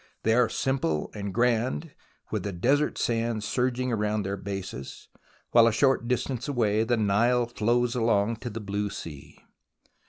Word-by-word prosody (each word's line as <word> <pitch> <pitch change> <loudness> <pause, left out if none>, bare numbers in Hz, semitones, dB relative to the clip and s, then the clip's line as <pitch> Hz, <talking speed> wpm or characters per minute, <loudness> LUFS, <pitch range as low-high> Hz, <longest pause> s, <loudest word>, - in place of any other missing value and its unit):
They 110 - +3
are 120 0 +4
simple 105 - -1
and 100 -2 -4
grand, 125 - 0 0.4
with - - -1
the 100 - -3
desert 135 +12 +1
sands 115 -2 -1
surging 125 +2 0
round 105 -2 0
their 100 +1 -2
bases, 95 -9 -7 0.4
while 115 -1 +7
a - - +4
short 130 +1 +2
distance 125 +1 -1
away 110 -6 +1
the 120 +1 +1
Nile 115 +4 +2
flows 120 +1 +1
along 115 -2 +1
to 120 - -6
the 115 0 -6
blue 100 0 -2
sea. 75 -7 -9
115 Hz, 155 wpm, -27 LUFS, 105-125 Hz, 0.4 s, while